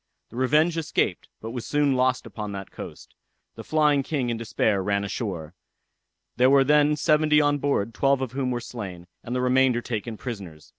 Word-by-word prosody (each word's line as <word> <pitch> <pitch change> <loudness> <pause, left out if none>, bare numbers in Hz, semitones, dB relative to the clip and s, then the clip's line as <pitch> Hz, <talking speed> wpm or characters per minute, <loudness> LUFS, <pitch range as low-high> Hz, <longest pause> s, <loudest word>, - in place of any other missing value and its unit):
The - - -14
Revenge 150 +6 +2
escaped, 160 - -1
but 115 - -6
was 120 -1 -5
soon 145 -2 +1
lost 130 0 +1
upon 105 -2 -6
that 95 -1 -7
coast. - - -10 0.4
The - - -9
Flying 150 -2 +2
King 135 -3 -2
in 115 - -2
despair 110 -3 0
run 100 +1 0
ashore. 95 -6 -4 0.8
There 125 +1 +5
were 135 0 +6
then 150 +1 +4
seventy 150 0 +3
on 145 -1 +2
board, 115 -6 0
twelve 135 +2 +2
of 130 -3 -3
whom 130 0 -2
were 120 -1 -2
slain, 95 -8 -7 0.2
and 120 - -4
the 125 - 0
remainder 125 -1 +3
taken 115 -1 -4
prisoners. 95 - -8
125 Hz, 185 wpm, -25 LUFS, 110-145 Hz, 0.8 s, were